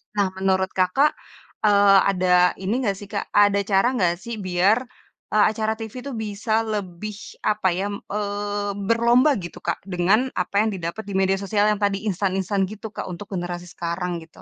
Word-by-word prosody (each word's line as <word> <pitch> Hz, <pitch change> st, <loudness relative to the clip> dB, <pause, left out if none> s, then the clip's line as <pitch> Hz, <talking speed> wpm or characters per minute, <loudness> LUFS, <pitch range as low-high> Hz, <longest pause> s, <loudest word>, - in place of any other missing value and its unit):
Nah 200 Hz, -2 st, +2 dB
menurut 190 Hz, 0 st, +1 dB
Kakak, 190 Hz, +11 st, +3 dB, 0.5 s
eee, 200 Hz, -1 st, +6 dB
ada 180 Hz, -1 st, +4 dB
ini 195 Hz, +3 st, -2 dB
nggak 200 Hz, -3 st, 0 dB
sih 205 Hz, -, -10 dB
Kak, 200 Hz, -1 st, -5 dB
ada 205 Hz, -1 st, +4 dB
cara 195 Hz, +3 st, +3 dB
nggak 175 Hz, -6 st, +2 dB
sih 235 Hz, +3 st, -6 dB
biar, 190 Hz, +6 st, +2 dB, 0.5 s
eee, 215 Hz, -1 st, +4 dB
acara 220 Hz, 0 st, -1 dB
TV 220 Hz, -1 st, -7 dB
tuh -, -, -4 dB
bisa 215 Hz, 0 st, -4 dB, 0.2 s
lebih 205 Hz, 0 st, -4 dB, 0.3 s
apa 210 Hz, -2 st, +1 dB
ya 190 Hz, +3 st, -1 dB
m -, -, -3 dB, 0.2 s
eee, 205 Hz, 0 st, -2 dB, 0.2 s
berlomba 235 Hz, +5 st, +4 dB
gitu 175 Hz, -1 st, -8 dB
Kak -, -, -1 dB
dengan 195 Hz, +8 st, +2 dB
apa 180 Hz, +2 st, -3 dB
yang -, -, 0 dB
didapat 170 Hz, +5 st, -5 dB
di 200 Hz, -, -5 dB
media 190 Hz, 0 st, +2 dB
sosial 205 Hz, +1 st, +2 dB
yang 210 Hz, -, -1 dB
tadi 200 Hz, 0 st, 0 dB
instan-instan 195 Hz, 0 st, 0 dB
gitu 215 Hz, +1 st, -8 dB
Kak -, -, -6 dB
untuk 185 Hz, +3 st, -8 dB
generasi 175 Hz, 0 st, -4 dB
sekarang 175 Hz, 0 st, -3 dB
gitu? 160 Hz, 0 st, -16 dB
200 Hz, 180 wpm, -23 LUFS, 185-210 Hz, 0.5 s, eee